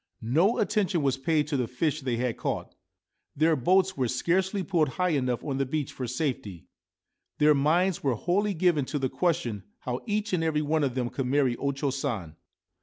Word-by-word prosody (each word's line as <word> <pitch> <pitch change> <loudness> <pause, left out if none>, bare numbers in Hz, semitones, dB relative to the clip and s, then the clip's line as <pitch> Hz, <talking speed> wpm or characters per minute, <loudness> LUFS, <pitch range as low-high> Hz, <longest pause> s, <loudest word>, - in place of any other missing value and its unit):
No 190 - +4
attention 200 -6 +1
was 135 -2 +2
paid 150 +1 +1
to 145 - 0
the 125 -2 0
fish 150 +5 -1
they 125 -3 -1
had 125 -1 -1
caught; - - -3 0.6
their 160 +2 +3
boats 185 +7 +2
were 130 -5 0
scarcely 185 - 0
pulled 165 -6 +1
high 180 +6 0
enough 130 -6 0
on 135 -2 -2
the 135 - +1
beach 150 0 -2
for 125 - -4
safety; 120 - -3 0.7
their 150 0 +5
minds 160 +6 +2
were 135 -4 +1
wholly 195 - 0
given 165 -4 +2
to 145 - -3
the 135 -2 -1
question 160 - -1 0.2
how 125 0 -3
each 210 -1 -1
and 170 -3 +1
every 155 -2 +1
one 155 +1 +1
of 130 -3 -1
them 125 -2 -1
could 135 -2 -2
marry 135 -2 +2
O 140 - 0
Cho 135 0 -2
San. 115 - -3
150 Hz, 195 wpm, -27 LUFS, 130-175 Hz, 0.7 s, their